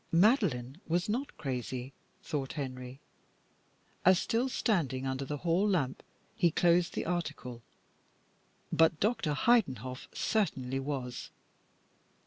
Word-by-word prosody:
Madeline 170 Hz, -, +3 dB
was 175 Hz, +2 st, +1 dB
not 245 Hz, +7 st, -2 dB
crazy, 130 Hz, -1 st, -4 dB, 0.3 s
thought 140 Hz, -3 st, -3 dB
Henry, 130 Hz, -2 st, -5 dB, 1.0 s
as 185 Hz, 0 st, +7 dB
still 235 Hz, +7 st, 0 dB
standing 155 Hz, -, 0 dB
under 130 Hz, +1 st, -2 dB
the 145 Hz, +2 st, -3 dB
hall 175 Hz, +6 st, +2 dB
lamp 145 Hz, -9 st, 0 dB, 0.3 s
he 175 Hz, -, +4 dB
closed 175 Hz, +1 st, +3 dB
the -, -, -1 dB
article, 155 Hz, -8 st, -3 dB, 1.1 s
but 160 Hz, -1 st, +4 dB
Dr. 195 Hz, -9 st, +1 dB
Heidenhoff 130 Hz, -, +1 dB
certainly 135 Hz, -, 0 dB
was. 135 Hz, -3 st, -4 dB
150 Hz, 110 wpm, -31 LUFS, 130-185 Hz, 1.1 s, as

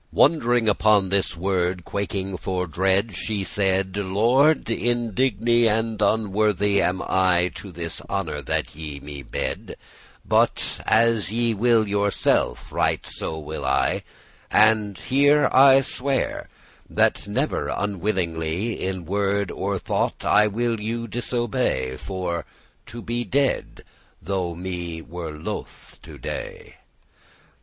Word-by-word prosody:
Wond'ring 120 Hz, -7 st, +3 dB
upon 105 Hz, -2 st, +3 dB
this 95 Hz, -3 st, 0 dB
word, 90 Hz, -1 st, -1 dB
quaking 100 Hz, -1 st, -3 dB
for 90 Hz, 0 st, -2 dB
dread, 95 Hz, +5 st, +1 dB
She 105 Hz, +1 st, -2 dB
saide; 95 Hz, 0 st, 0 dB
"Lord, 120 Hz, +10 st, +3 dB
indigne 120 Hz, 0 st, +1 dB
and 110 Hz, 0 st, 0 dB
unworthy 105 Hz, -1 st, +2 dB
Am 90 Hz, +1 st, 0 dB
I 90 Hz, -1 st, +2 dB
to 100 Hz, -, -9 dB
this 85 Hz, -1 st, -5 dB
honour 80 Hz, -7 st, -2 dB
that 65 Hz, -, -2 dB
ye 75 Hz, -2 st, -7 dB
me 70 Hz, 0 st, -8 dB
bede,* 65 Hz, -, -4 dB
*offer -, -, -11 dB, 0.5 s
But -, -, +1 dB
as 110 Hz, -4 st, +3 dB
ye 115 Hz, 0 st, +1 dB
will 115 Hz, 0 st, +3 dB
yourself, 100 Hz, 0 st, 0 dB
right -, -, 0 dB
so 80 Hz, -, -5 dB
will 75 Hz, -1 st, -6 dB
I: 65 Hz, 0 st, +1 dB, 0.5 s
And 105 Hz, -3 st, +3 dB
here 145 Hz, +2 st, +3 dB
I 135 Hz, 0 st, +7 dB
swear, 135 Hz, +1 st, -2 dB, 0.4 s
that -, -, +1 dB
never -, -, -1 dB, 0.2 s
willingly 90 Hz, 0 st, -2 dB
In 95 Hz, -2 st, -3 dB
word 100 Hz, +1 st, 0 dB
or 100 Hz, +1 st, -2 dB
thought -, -, -2 dB
I 105 Hz, +1 st, +5 dB
will 115 Hz, +2 st, -1 dB
you 115 Hz, +2 st, -3 dB
disobey, 120 Hz, -, -1 dB
For 90 Hz, -3 st, -4 dB, 0.4 s
to 120 Hz, -1 st, -8 dB
be 120 Hz, +1 st, -2 dB
dead; 135 Hz, +6 st, -1 dB, 0.4 s
though 90 Hz, -1 st, -3 dB
me 85 Hz, -2 st, -5 dB
were 85 Hz, 0 st, -6 dB
loth 75 Hz, +1 st, -7 dB
to -, -, -12 dB
dey." -, -, -7 dB
100 Hz, 125 wpm, -23 LUFS, 90-115 Hz, 0.5 s, I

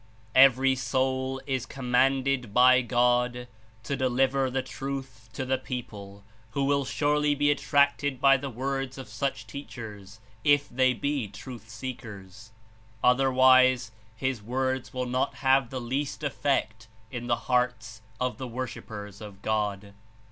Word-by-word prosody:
"Every 135 Hz, 0 st, +6 dB
soul 130 Hz, +2 st, -1 dB
is 130 Hz, -2 st, -2 dB
commanded 130 Hz, -2 st, +1 dB
by 130 Hz, +1 st, +7 dB
God 125 Hz, 0 st, +1 dB, 0.4 s
to 140 Hz, +4 st, -2 dB
deliver 130 Hz, +1 st, +1 dB
the 130 Hz, +1 st, -1 dB
Truth 130 Hz, -4 st, -6 dB
to 130 Hz, -, -4 dB
the 130 Hz, 0 st, 0 dB
people 100 Hz, -6 st, -7 dB, 0.3 s
who 140 Hz, -, 0 dB
will 140 Hz, 0 st, +1 dB
surely 150 Hz, +1 st, +1 dB
be 145 Hz, +1 st, +3 dB
attracted 140 Hz, 0 st, +1 dB
by 135 Hz, 0 st, +6 dB
the 135 Hz, +1 st, -5 dB
words 135 Hz, +2 st, -3 dB
of 130 Hz, -, -8 dB
such 135 Hz, -5 st, -3 dB
teachers, 105 Hz, -4 st, -9 dB, 0.2 s
if 145 Hz, -1 st, +4 dB
they 130 Hz, 0 st, +2 dB
be 140 Hz, 0 st, -2 dB
truth 110 Hz, +3 st, -10 dB
seekers; 110 Hz, -3 st, -8 dB, 0.5 s
otherwise 130 Hz, -1 st, +5 dB, 0.2 s
his 130 Hz, -1 st, -2 dB
words 130 Hz, +3 st, -2 dB
will 130 Hz, 0 st, -3 dB
not 125 Hz, +1 st, -1 dB
have 135 Hz, -2 st, +2 dB
the 130 Hz, -, -4 dB
least 135 Hz, +5 st, -3 dB
effect 115 Hz, -6 st, -1 dB, 0.2 s
in 120 Hz, -1 st, -5 dB
the 120 Hz, -, +3 dB
hearts 115 Hz, -3 st, -1 dB, 0.2 s
of 125 Hz, 0 st, -2 dB
the 130 Hz, -, -4 dB
worshippers 110 Hz, -5 st, -7 dB
of 100 Hz, -2 st, -11 dB
God. 105 Hz, -2 st, -2 dB
130 Hz, 135 wpm, -27 LUFS, 115-135 Hz, 0.5 s, by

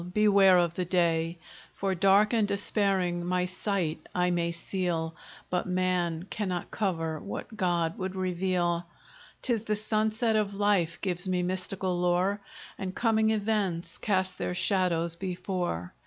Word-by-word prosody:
beware 200 Hz, -3 st, +6 dB
of 170 Hz, -2 st, +2 dB
the 180 Hz, +1 st, -2 dB
day; 170 Hz, -1 st, +1 dB, 0.4 s
For, 195 Hz, -1 st, -1 dB
dark 195 Hz, +4 st, +4 dB
and 220 Hz, -3 st, +3 dB
despairing, 195 Hz, -3 st, +1 dB
my 180 Hz, +1 st, 0 dB
sight 185 Hz, -3 st, -1 dB, 0.2 s
I 180 Hz, 0 st, +2 dB
may 170 Hz, -1 st, 0 dB
seal, 170 Hz, -1 st, -2 dB, 0.4 s
But 180 Hz, 0 st, 0 dB
man 180 Hz, -2 st, 0 dB
cannot 185 Hz, -5 st, -3 dB
cover 165 Hz, -6 st, -1 dB
what 205 Hz, +4 st, -7 dB
God 175 Hz, 0 st, 0 dB
would 190 Hz, 0 st, -3 dB
reveal; 180 Hz, -2 st, 0 dB, 0.6 s
'Tis 235 Hz, -4 st, 0 dB
the 215 Hz, -, +1 dB
sunset 220 Hz, +2 st, 0 dB
of 205 Hz, -2 st, 0 dB
life 195 Hz, -5 st, +1 dB
gives 180 Hz, -1 st, -3 dB
me 180 Hz, -1 st, +1 dB
mystical 185 Hz, 0 st, -1 dB
lore, 180 Hz, +3 st, +1 dB, 0.4 s
And 185 Hz, -1 st, -4 dB
coming 220 Hz, -2 st, +2 dB
events 200 Hz, -6 st, -1 dB
cast 190 Hz, -3 st, 0 dB
their 180 Hz, -, -2 dB
shadows 175 Hz, -4 st, +1 dB
before. 175 Hz, -, -3 dB
185 Hz, 140 wpm, -29 LUFS, 175-200 Hz, 0.6 s, beware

